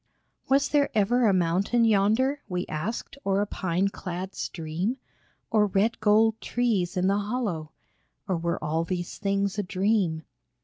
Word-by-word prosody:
Was 275 +1 +3
there 290 -1 +3
ever 230 +3 +3
a - - +5
mountain 190 +6 +2
yonder, 225 +7 +2
We 180 0 -2
asked, 210 - -5
or 195 0 +1
a 205 - +2
pine 190 -1 -1
clad 185 0 -6
stream? 170 +9 -3 0.5
Or 210 -1 +4
red 200 +4 +1
gold 220 +1 +3
trees 210 -8 0
in 180 - +1
the 200 +2 +2
hollow? 205 -8 -3 0.6
Or 190 - 0
were 170 +1 -2
all 160 +2 0
these 175 +1 -4
things 200 0 0
a - - +1
dream 185 -4 0
200 Hz, 150 wpm, -26 LUFS, 180-225 Hz, 0.6 s, a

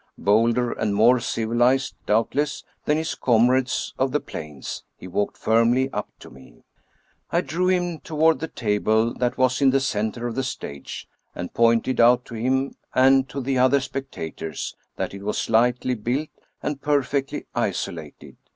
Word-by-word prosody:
Bolder 115 +4 +2
and 105 -2 -1
more 120 +4 +5
civilized, 120 +4 +1
doubtless, 135 +7 0 0.2
than 150 - +2
his 160 0 -2
comrades 125 +2 +2
of 130 0 +1
the 150 - +1
plains, 75 - -7
he - - -10
walked 100 +3 -2
firmly 120 +4 +2
up - - -3
to - - -12
me. 65 0 -17 0.7
I - - +2
drew 180 +3 -1
him 175 -3 0
toward 160 -2 +2
the 160 - -3
table 110 -1 +1
that 125 0 -1
was 130 +1 +2
in 135 - +6
the 135 +1 +3
center 115 -2 -2
of 120 - -2
the 135 - -1
stage, 70 - -6 0.3
and 90 - -6
pointed 115 +2 +2
out 125 +1 +5
to - - -11
him 130 +4 0 0.2
and 135 +1 +5
to 140 - -5
the 130 0 0
other 130 +2 +5
specta 135 - -5
tors 80 -3 -5 0.2
that - - -3
it 100 - -8
was 105 +1 -2
slightly 125 +3 +2
built 125 +7 -2 0.3
and 145 -1 -3
perfectly 140 -1 0
isolated. - - -4
125 Hz, 160 wpm, -23 LUFS, 110-135 Hz, 0.7 s, in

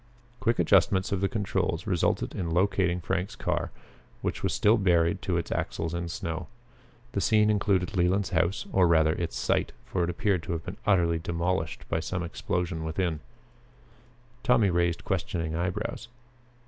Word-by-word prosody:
Quick 115 -2 +1
adjustments 95 0 +3
of 100 -2 0
the 100 - +2
controls 105 -4 -1
resulted - - 0
in 90 - -3
the 80 - -2
locating 95 -1 +2
of 90 - -8
Frank's 95 +2 -2
car, - - -1 0.5
which - - -2
was - - 0
still 110 +3 +4
buried 90 -1 +2
to 90 -2 0
its 85 - -3
axles 80 0 -2
in 85 0 -3
snow. 85 0 -4 0.6
The 100 - -1
scene 105 0 +4
included 100 -3 +1
Leland's 95 +2 +2
house, 85 +2 +1
or 95 -2 +4
rather 80 -2 +4
its 85 -2 -3
site, - - 0
for 90 - -1
it 85 - 0
appeared 95 0 0
to 85 - -4
have 80 0 -4
been 90 +3 -6
utterly 85 -5 +3
demolished 85 0 -2
by 80 - 0
some 90 +2 -3
explosion 85 0 -2
within. 80 0 -1 1.2
Tommy 115 -6 +3
raised 85 -1 0
questioning 80 -3 -2
eyebrows. 95 +7 -3
90 Hz, 165 wpm, -28 LUFS, 85-95 Hz, 1.2 s, still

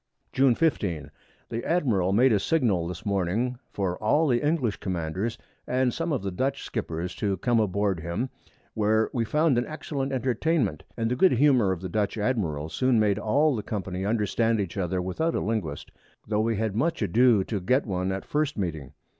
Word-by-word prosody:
June 130 -2 +4
15. 90 - 0 0.4
The 115 - -3
Admiral 115 - +1
made 120 +4 +4
a 105 - +3
Signal 105 - +1
this 90 -1 -7
Morning 100 +6 0
for 95 -3 -2
all 150 +9 +3
the 120 -3 +2
English 145 -8 +1
Commanders, 95 +5 -3 0.3
and 130 -1 +1
some 165 0 -2
of 135 -8 -1
the 100 - -2
Dutch 135 +9 -2
Skippers 90 -6 -4
to 100 -2 -1
come 120 +5 +2
aboard 100 -3 0
him, 85 +11 -3 0.4
where 110 +1 +2
we 120 - +1
found 150 +1 +2
an 120 - -2
excellent 140 -3 -4
Entertainment, 130 - 0 0.2
and 115 0 -1
the - - +1
good 185 +8 +4
Humour 125 -6 +4
of 90 -2 -3
the 95 - -4
Dutch 105 +3 -1
Admiral 100 - -1
soon 130 +7 +2
made 105 -1 +2
all 140 +7 +2
the 110 - -2
Company 95 -3 -4
understand 110 +2 +1
each 95 -4 -3
other 90 -1 -1
without 160 - -1
a - - +1
Linguist, 100 -10 -3 0.4
tho' 105 0 0
we 115 +1 +1
had 105 -1 -1
much 145 +2 0
ado 110 +1 +4
to 100 0 -3
get 125 +9 +2
one 95 -3 -1
at 95 0 -4
first 150 -2 -1
Meeting. 80 -8 -4
110 Hz, 190 wpm, -26 LUFS, 95-130 Hz, 0.4 s, June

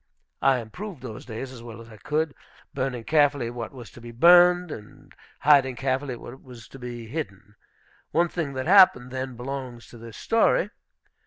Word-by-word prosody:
I 135 -1 +4
improved 135 - -8
those 115 -4 -8
days 125 +3 -6
as 125 -3 -11
well 115 -1 -10
as 115 - -12
I 110 -1 -14
could, 155 +4 -1 0.4
burning 130 -3 -3
carefully 145 -2 +2
what 120 -2 -6
was 125 -4 -11
to 120 - -14
be 120 - -10
burned, 175 +6 +5
and 105 -5 -11 0.3
hiding 135 -3 +4
carefully 130 +1 -2
what 120 +2 -11
was 125 -4 -13
to 135 - -12
be 120 -2 -7
hidden. 105 - -7 0.6
One 170 +2 +2
thing 160 -5 -4
that 130 0 -4
happened 175 -9 +6
then 130 -1 -5
belongs 125 -1 -6
to 120 - -13
this 115 -1 -11
story. 225 -3 +2
130 Hz, 175 wpm, -25 LUFS, 120-150 Hz, 0.6 s, happened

